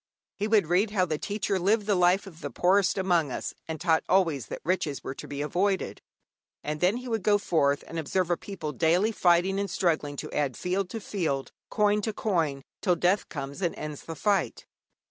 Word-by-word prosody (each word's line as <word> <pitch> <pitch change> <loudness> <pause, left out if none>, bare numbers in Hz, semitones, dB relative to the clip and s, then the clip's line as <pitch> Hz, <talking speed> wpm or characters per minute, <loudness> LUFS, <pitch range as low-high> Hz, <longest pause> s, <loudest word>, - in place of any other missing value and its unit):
He 210 - -2
would 215 -4 +4
read 180 +6 +2
how 195 -3 +2
the 155 -3 -2
Teacher 200 -1 -1
lived 205 +4 +2
the 210 - +2
life 180 +1 +3
of 170 -4 -12
the 145 - -4
poorest 185 +9 +2
among 175 -6 +2
us, - - -4
and 160 -1 -4
taught 165 -2 +2
always 165 -8 +2
that - - -6
riches 170 -5 -1
were 135 - -4
to - - -9
be 145 0 -4
avoided. 190 +5 -1 0.6
And 150 0 -3
then 185 +7 +2
he 250 +1 -7
would 225 -3 -1
go 205 +1 +4
forth 145 -8 +1
and 165 - -5
observe 175 +3 0
a - - +4
people 170 -5 -6
daily 175 +8 +2
fighting 185 0 +3
and 200 0 -2
struggling 155 -5 0
to - - -6
add 140 -4 -1
field 185 +1 -1
to 225 - -5
field, 160 -10 -2 0.2
coin 210 -1 +2
to 220 +1 -2
coin, 160 -11 -1 0.2
till 180 - +3
death 180 +4 +1
comes 140 +2 -6
and 175 -3 0
ends 150 -1 -6
the 165 - -7
fight. 200 +6 0
180 Hz, 205 wpm, -27 LUFS, 155-200 Hz, 0.6 s, would